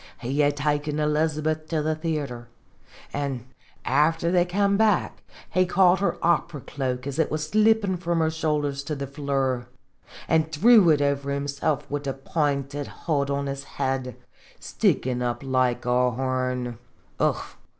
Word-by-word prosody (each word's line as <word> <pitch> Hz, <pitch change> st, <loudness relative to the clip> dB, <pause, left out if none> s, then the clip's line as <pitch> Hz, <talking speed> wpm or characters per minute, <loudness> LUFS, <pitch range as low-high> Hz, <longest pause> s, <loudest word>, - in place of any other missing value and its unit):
He 130 Hz, +4 st, -2 dB
had 145 Hz, 0 st, +3 dB
taken 145 Hz, 0 st, 0 dB
Miss 150 Hz, 0 st, 0 dB
Elizabeth 155 Hz, +1 st, 0 dB
to 155 Hz, -2 st, -1 dB
the 155 Hz, +1 st, +1 dB
theatre; 150 Hz, -7 st, -4 dB, 0.7 s
an* 140 Hz, -4 st, -3 dB, 0.4 s
after 160 Hz, +5 st, +2 dB
they 175 Hz, -1 st, +3 dB
kem 200 Hz, +2 st, +1 dB
back, 210 Hz, -2 st, +1 dB, 0.3 s
he 185 Hz, 0 st, +2 dB
caught 180 Hz, 0 st, +4 dB
her 200 Hz, -, 0 dB
opera 170 Hz, -3 st, +1 dB
cloak, 130 Hz, -2 st, -3 dB
as 140 Hz, +2 st, -4 dB
it 160 Hz, -, +2 dB
was 155 Hz, 0 st, -2 dB
slippin' 215 Hz, -1 st, +3 dB
from 170 Hz, -1 st, -1 dB
her 160 Hz, -1 st, +2 dB
shoulders 150 Hz, -3 st, -1 dB
to 150 Hz, -, -3 dB
the 140 Hz, 0 st, -4 dB
floor, 135 Hz, -3 st, -2 dB, 0.6 s
an' 160 Hz, -1 st, +3 dB
threw 185 Hz, +5 st, +5 dB
it 145 Hz, -2 st, +4 dB
over 140 Hz, 0 st, 0 dB
himsilf 140 Hz, +1 st, -1 dB
wid 145 Hz, 0 st, -4 dB
the 135 Hz, -, -1 dB
pinted 140 Hz, 0 st, -2 dB, 0.2 s
hood 140 Hz, -4 st, +1 dB
on 140 Hz, 0 st, -1 dB
his 140 Hz, 0 st, -4 dB
head, 130 Hz, -3 st, -1 dB, 0.4 s
stickin' 125 Hz, -1 st, 0 dB
up 120 Hz, +2 st, -2 dB
like 130 Hz, -3 st, 0 dB
a 125 Hz, 0 st, +3 dB
horn. 125 Hz, -1 st, -2 dB, 0.4 s
Ugh -, -, +2 dB
145 Hz, 155 wpm, -25 LUFS, 135-160 Hz, 0.7 s, threw